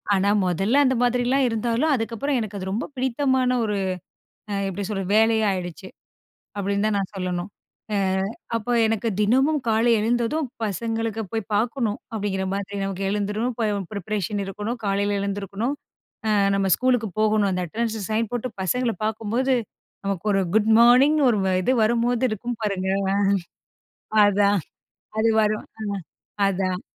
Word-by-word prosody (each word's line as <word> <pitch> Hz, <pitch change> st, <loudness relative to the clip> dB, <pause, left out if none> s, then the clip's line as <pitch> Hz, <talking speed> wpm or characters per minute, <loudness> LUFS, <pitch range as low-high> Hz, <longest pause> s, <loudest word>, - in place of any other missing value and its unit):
ஆனா, 195 Hz, +1 st, +2 dB, 0.2 s
மொதல்ல 195 Hz, -, +2 dB
அந்த 260 Hz, -1 st, +2 dB
மாதிரிலாம் 250 Hz, +2 st, +2 dB
இருந்தாலும், 235 Hz, +7 st, 0 dB
அதுக்கப்பறம் 240 Hz, +4 st, -1 dB
எனக்கு 205 Hz, -2 st, -5 dB
அது 190 Hz, 0 st, -4 dB
ரொம்ப 220 Hz, -, -2 dB
பிடித்தமான 260 Hz, 0 st, +1 dB
ஒரு 210 Hz, -1 st, -1 dB, 0.8 s
அ -, -, -1 dB
எப்பிடி 195 Hz, +1 st, -4 dB
சொல்றது? 195 Hz, -2 st, -3 dB
வேலையா 220 Hz, 0 st, +4 dB
ஆயிடுச்சு. 180 Hz, +1 st, -5 dB, 0.7 s
அப்பிடின்னு 200 Hz, +1 st, 0 dB
தான் 210 Hz, -, 0 dB
நான் 195 Hz, 0 st, -3 dB
சொல்லணும். 180 Hz, 0 st, -3 dB, 0.5 s
அ -, -, +2 dB, 0.6 s
அப்போ 230 Hz, +2 st, -2 dB
எனக்கு 225 Hz, +1 st, 0 dB
தினமும் 265 Hz, +8 st, +3 dB
காலை 225 Hz, +2 st, +3 dB
எழுந்ததும், 240 Hz, +7 st, 0 dB, 0.2 s
பசங்களுக்கு 225 Hz, +2 st, -2 dB
போய் 220 Hz, -1 st, -3 dB
பார்க்கணும் 225 Hz, -1 st, 0 dB
அப்பிடிங்கிற 200 Hz, -3 st, -2 dB
மாதிரி 200 Hz, 0 st, -4 dB
நமக்கு 195 Hz, 0 st, -3 dB
எழுந்துரும், 210 Hz, +4 st, -1 dB
இப்ப 225 Hz, -2 st, 0 dB, 0.3 s
ப்ரிப்பரேஷன் 205 Hz, 0 st, -2 dB
இருக்கணும் 210 Hz, +5 st, -4 dB
காலையில 200 Hz, +1 st, +1 dB
எழுந்துருக்கணும். 200 Hz, +5 st, -2 dB, 0.5 s
அ -, -, +2 dB, 0.2 s
நம்ம 195 Hz, -1 st, +1 dB
ஸ்கூலுக்கு 250 Hz, -3 st, +1 dB
போகணும். 215 Hz, -1 st, +3 dB
அந்த 185 Hz, -1 st, -1 dB
அட்டெண்டன்ஸ 225 Hz, +4 st, -2 dB
சைன் 220 Hz, +1 st, 0 dB
போட்டு 245 Hz, +1 st, -2 dB
பசங்கள 245 Hz, +5 st, 0 dB
பார்க்கும்போது 225 Hz, +5 st, 0 dB, 0.5 s
நமக்கு 195 Hz, 0 st, -3 dB
ஒரு 195 Hz, -1 st, +2 dB
குட் 220 Hz, 0 st, +3 dB
மார்னிங் 255 Hz, +6 st, +6 dB
ஒரு 225 Hz, -4 st, +2 dB
வ -, -, +2 dB
இது 250 Hz, -, +2 dB
வரும்போது 235 Hz, +2 st, +1 dB
இருக்கும் 230 Hz, +2 st, -4 dB
பாருங்க! 195 Hz, -3 st, -1 dB, 0.2 s
அ. -, -, +1 dB, 1.1 s
அதான் 205 Hz, 0 st, +3 dB, 0.6 s
அது 225 Hz, +1 st, +3 dB
வரும். 215 Hz, 0 st, 0 dB
அ, -, -, -4 dB, 0.7 s
அதான். 185 Hz, -1 st, -1 dB
215 Hz, 145 wpm, -24 LUFS, 200-240 Hz, 1.1 s, மார்னிங்